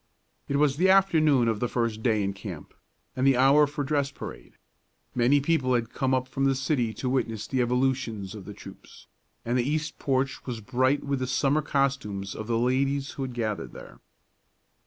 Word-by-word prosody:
It 140 - -2
was 140 -1 +2
the 185 +3 +3
afternoon 155 -10 +4
of 110 -2 0
the 120 - 0
first 115 -2 -2
day 110 -3 +1
in 100 0 -1
camp, 95 -5 -9 0.4
and 130 +1 +1
the 135 -2 +4
hour 140 +3 +5
for 145 0 -4
dress 140 -1 0
parade. 140 - -10 0.6
Many 125 +4 +3
people 140 -4 +1
had 115 -1 -2
come 130 -1 0
up 130 0 -1
from 135 +1 -1
the 135 0 +3
city 130 -3 0
to 130 - -4
witness 115 -5 -1
the 130 +3 -1
evolutions 125 -5 -1
of 105 -4 -9
the - - -8
troops, - - -13 0.4
and 120 +2 +1
the 120 +3 0
east 155 +1 -2
porch 135 -1 -1
was 120 -3 -4
bright 130 +5 +1
with 140 -1 -1
the 130 - -2
summer 140 +3 +1
costumes 125 -10 -1
of 110 - -7
the 115 -1 +1
ladies 135 +3 0
who - - -7
had 130 -2 -4
gathered 110 -3 -3
there. - - -12
130 Hz, 195 wpm, -27 LUFS, 115-140 Hz, 0.6 s, hour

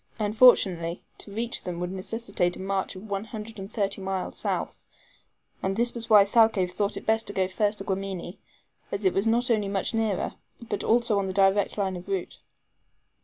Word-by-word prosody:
Unfortunately, 205 -6 +4 0.2
to 205 - -10
reach 230 +3 -2
them 175 -1 -5
would 180 0 -3
necessitate 190 -2 -2
a - - -10
march 190 0 -2
of 185 - -9
one 200 +1 -3
hundred 220 -1 -8
and 195 +2 -7
thirty 200 -2 -1
miles 190 -1 -3
south; - - -3 0.8
and 195 0 -1
this 240 +1 +1
was 230 -1 -5
why 210 -2 +8
Thalcave 205 -4 +3
thought 200 +2 -1
it - - -8
best 225 0 +1
to 205 - -4
go 190 -2 +1
first 205 +2 0
to 195 - -4
Guamini, 190 -2 -4 0.5
as 200 0 -3
it 185 - +4
was 195 +3 +1
not 240 +2 +2
only 210 -3 +2
much 195 +3 -1
nearer, 220 -4 0 0.3
but 225 -3 -4
also 230 -3 +3
on 195 - -1
the 190 - -3
direct 195 +1 +3
line 190 -2 -1
of 180 +1 -9
route. 195 -3 -3
200 Hz, 195 wpm, -26 LUFS, 190-220 Hz, 0.8 s, why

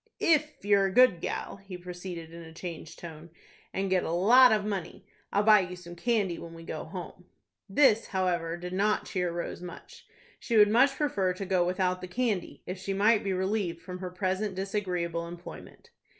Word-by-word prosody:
"If 305 -7 +1
you're 200 -1 +4
a - - -3
good 235 -6 +5
gal," - - -4
he 195 -2 -9
proceeded, 175 -2 -8
in 170 - -9
a 160 -1 -11
changed 165 -2 -8
tone, 165 -1 -10 0.4
"and 195 0 -2
get 185 -1 +3
a - - -3
lot 235 +9 +7
of 210 -1 +2
money, 195 -5 -4 0.3
I'll 205 - +2
buy 215 0 +7
you 180 -1 -3
some 175 -1 -11
candy 200 -3 0
when 165 0 -9
we 165 - -10
go 160 -1 -6
home." 180 +1 -8 0.4
This, 225 0 +4
however, 175 -3 -1
did 180 +1 -7
not 210 +3 +1
cheer 180 -3 -1
Rose 170 0 -5
much. 180 -1 -11 0.3
She 230 - 0
would 210 -1 +7
much 270 +4 +4
prefer 200 -11 0
to 195 +2 -6
go 185 -2 +2
without 180 0 0
the 185 - -6
candy, 215 -1 -2
if 185 +1 -5
she 195 +1 -3
might 210 +2 +4
be 195 - -1
relieved 190 -2 -1
from 180 -1 -7
her 185 -1 -5
present 190 +2 -2
disagreeable 180 -4 -2
employment. 175 +1 -11
185 Hz, 195 wpm, -29 LUFS, 175-205 Hz, 0.4 s, lot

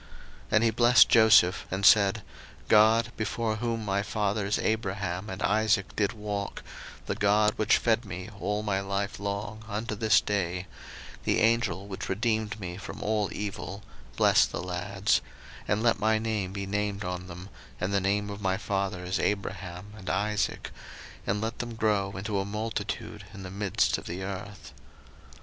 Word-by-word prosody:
01:048:015 - - -21 0.5
And 105 - +5
he 115 - +4
blessed 120 +2 +6
Joseph, 105 -5 +6
and 95 +1 -1
said, 100 0 +5 0.4
God, 110 +2 +5
before 110 0 -1
whom 115 -1 -2
my 100 0 +1
fathers 105 0 -1
Abraham 100 -3 -2
and 95 +2 -5
Isaac 105 -2 +2
did 105 +2 +1
walk, 105 -2 -4 0.4
the - - -1
God 105 +1 +3
which 110 +1 +4
fed 115 0 +1
me 95 -2 -7
all 105 +1 -1
my 100 -2 0
life 100 +1 -3
long 105 +2 -4
unto 110 +1 -3
this 110 +1 +4
day, 90 -3 -2 0.5
01:048:016 - - -24
The - - +2
Angel 110 -5 +1
which 95 -2 -6
redeemed 110 +1 -1
me 90 -2 -6
from 100 - -7
all 105 -1 0
evil, 100 -1 -5 0.3
bless - - +5
the - - -5
lads; 95 +3 0 0.5
and 105 +2 +1
let 115 -3 +3
my 110 +1 +3
name 110 -4 -2
be 100 0 -4
named 100 +1 -2
on 90 0 -4
them, 90 +2 -9 0.3
and 95 +3 -1
the 100 - +2
name 100 +2 0
of 100 0 -7
my 95 -1 +1
fathers 95 -3 -2
Abraham 100 -1 -3
and 95 -3 -7
Isaac; 105 +2 -1 0.6
and 105 - +1
let 110 +1 -3
them 120 -1 -4
grow 105 -3 +1
into 100 +1 -2
a - - 0
multitude 105 -1 -4
in 100 - -8
the 90 - -7
midst 100 -1 +1
of - - -11
the 90 +3 -5
earth. 100 +1 -7
100 Hz, 170 wpm, -28 LUFS, 95-110 Hz, 0.6 s, blessed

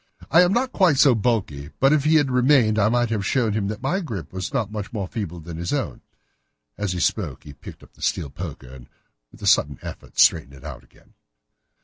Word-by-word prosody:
"I 165 +4 +7
am 180 0 +3
not 255 +4 0
quite 180 - +3
so 135 -1 +6
bulky, 100 - -1
but 135 +2 +4
if 150 -2 +1
he 155 +1 +4
had 145 -4 +3
remained 125 -4 +3
I 105 +1 +3
might 120 0 +1
have 105 -3 -1
shown 115 0 +1
him 105 -2 -1
that 110 +4 -6
my 145 +9 0
grip 110 - -6
was 95 -2 -4
not 115 -6 -2
much 105 -2 -5
more 100 -5 -4
feeble 90 -5 -5
than 80 0 -8
his 85 +1 -4
own." - - -3 0.7
As 105 -3 -2
he 90 - -3
spoke 80 -10 -1
he 75 - -11
picked 70 - -12
up - - -19
the - - -21
steel 70 - -1
poker 65 - -8
and, 60 -2 -13 0.4
with - - -15
a - - -3
sudden 70 -2 +3
effort, - - -10
straightened 75 -4 +4
it 65 - -16
out 70 -6 -8
again. - - -25
105 Hz, 230 wpm, -23 LUFS, 85-130 Hz, 0.7 s, I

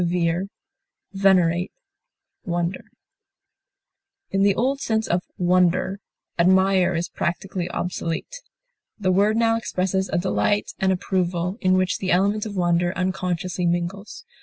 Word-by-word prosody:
approve, 175 +1 0 0.7
esteem, 185 -3 +3 0.8
love, 175 0 0 1.6
In 195 - +1
the 200 0 +4
old 270 +4 0
sense 220 -1 0
of 175 +1 +1 0.2
wonder, 180 +2 +2 0.4
admire 190 0 +4
is 170 +1 -1
practically 175 +1 -3
obsolete; 175 - -4 0.6
the 185 -3 0
word 205 +4 +3
now 225 -1 +3
expresses 190 -3 -1
a - - 0
delight 195 +3 0
and 190 0 +2
approval, 180 +1 -1
in 185 -1 +3
which 185 0 0
the 190 - -3
element 200 +4 +2
of 205 - -7
wonder 175 0 +2
unconsciously 180 -1 -1
mingles. 185 - -3
185 Hz, 120 wpm, -23 LUFS, 175-195 Hz, 1.6 s, the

